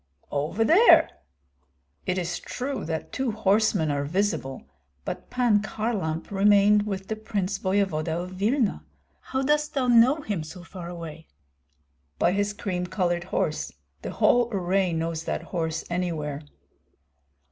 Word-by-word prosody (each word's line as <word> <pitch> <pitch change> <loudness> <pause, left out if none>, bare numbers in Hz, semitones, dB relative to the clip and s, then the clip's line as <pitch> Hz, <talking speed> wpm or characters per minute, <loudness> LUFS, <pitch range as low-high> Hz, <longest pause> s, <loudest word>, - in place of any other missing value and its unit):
"Over 150 +10 0
there!" 400 - +6 1.0
"It 185 - 0
is 175 -1 -2
true 255 -3 -4
that 160 0 -4
two 265 -1 -1
horsemen 205 -6 +2
are 140 0 -1
visible, 160 -4 -1 0.4
but - - -5
Pan 240 -5 +3
Kharlamp 210 -8 -3
remained 205 +1 +4
with 195 -2 -4
the 220 - -2
prince 200 -3 -2
voevoda 175 -4 0
of 180 - -8
Vilna. 215 +5 0 0.4
How 265 0 -2
dost 300 +2 +1
thou 265 -2 +1
know 245 +5 +5
him 205 - -3
so 175 +3 -10
far 175 0 -8
away?" 165 -2 -8 0.9
"By 175 - +3
his 205 +2 0
cream 190 -4 -3
colored 175 -2 -1
horse. - - -1 0.3
The - - -5
whole 240 -1 +3
array 190 -1 +1
knows 165 0 -2
that - - -2
horse 160 -2 -3
anywhere." 160 -5 -2
195 Hz, 135 wpm, -26 LUFS, 170-215 Hz, 1.0 s, there